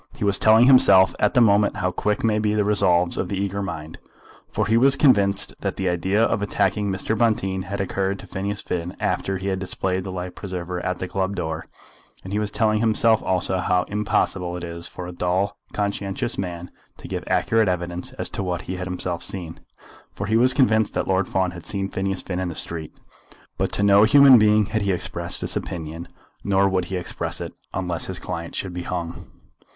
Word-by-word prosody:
He - - -5
was 100 -1 +4
telling 110 +2 +6
himself 100 -8 +7
at 105 - +1
the 125 - +6
moment 105 -2 +4
how 90 -3 -1
quick 105 +3 -1
may 110 -1 +2
be 105 0 0
the 105 - +2
resolves 90 -4 +2
of 90 - -2
the 100 - -2
eager 100 +1 -2
mind, 80 -5 -6 0.5
for - - -1
he 110 - +2
was 135 +3 +5
convinced 100 -9 +3
that - - -3
the 95 - -2
idea 95 +5 +1
of 110 - +1
attacking 105 0 0
Mr. 95 +3 -1
Bonteen 95 -4 0
had 100 +2 -5
occurred 95 +1 -1
to - - -11
Phineas 100 +2 -4
Finn 90 0 -4
after 95 0 -1
he 95 +1 -3
had 95 -1 -1
displayed 95 0 -2
the 95 - -6
life 90 0 -5
preserver 90 -2 -5
at 90 0 -2
the 90 - -4
club 95 +1 -2
door; 80 -2 -4 0.6
and 95 - -7
he 105 - +1
was 105 -1 -1
telling 110 0 +1
himself 110 0 +3
also 95 0 0
how 90 0 +1
impossible 95 -3 -1
it 90 - -8
is 85 0 -6
for 90 - -8
a 90 - -6
dull 90 +3 -1 0.2
conscientious 100 +2 -2
man 90 -2 -5 0.3
to - - -10
give - - -4
accurate 110 -3 +2
evidence 90 0 -3
as - - -3
to - - -3
what 90 -2 -3
he 95 - -5
had 90 0 -5
himself 90 -1 -3
seen, 85 -4 -6 0.6
for 100 - -4
he 110 +2 0
was 125 +3 +5
convinced 110 -5 +2
that - - -1
Lord 95 0 +1
Fawn 95 -1 0
had 90 -2 -10
seen 100 -2 -2
Phineas 95 -1 -3
Finn 90 -1 -4
in 95 - -2
the 85 - -5
street. 80 -2 -4 0.7
But - - 0
to 100 - +1
no 100 0 +6
human 135 +1 +8
being 105 0 +4
had 110 +2 -2
he 100 -1 +1
expressed 90 - -3
this - - -1
opinion; 80 0 -5 0.4
nor 100 0 +3
would 95 -2 0
he 95 - -5
express 90 -1 -4
it, - - -6 0.2
unless 90 -3 -2
his - - -3
client 85 0 -6
should 95 -2 -3
be 90 - -4
hung. 85 -1 -5
95 Hz, 210 wpm, -23 LUFS, 90-105 Hz, 0.7 s, human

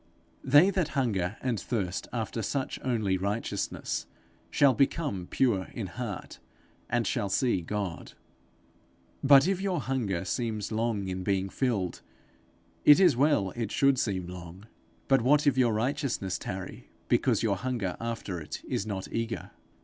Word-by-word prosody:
They 145 +8 +6
that 185 -5 0
hunger 105 -6 0
and 125 -5 0
thirst 100 -6 -3
after 115 -1 -3
such 135 +5 -2
only 110 -7 0
righteousness, 100 +4 -2 0.4
shall 140 -2 +4
become 135 - 0
pure 105 -8 +1
in 115 - -3
heart, 105 +1 -6 0.5
and 120 -1 +1
shall 100 - -1
see 120 -2 +1
God. 100 -1 -4 1.1
If 145 +7 +6
your 190 -4 0
hunger 110 -10 -2
seems 110 +1 -2
long 110 -3 -1
in 95 0 -3
being 95 0 0
filled, 105 -8 -1 0.8
it 145 +3 +8
is 180 -8 +6
well 135 -8 +2
it 115 -1 -4
should 135 -2 +3
seem 95 -4 -1
long. 90 +2 -9 0.4
But 135 -2 +4
what 145 +5 +4
if 140 -3 +4
your 125 -3 +3
righteousness 115 - -1
tarry, 95 0 -7 0.2
because - - +2
your 100 -4 +1
hunger 105 -4 -2
after 115 -6 -4
it 75 -2 -7
is 100 - -2
not 95 -3 -4
eager? 115 0 -3
115 Hz, 140 wpm, -29 LUFS, 95-130 Hz, 1.1 s, it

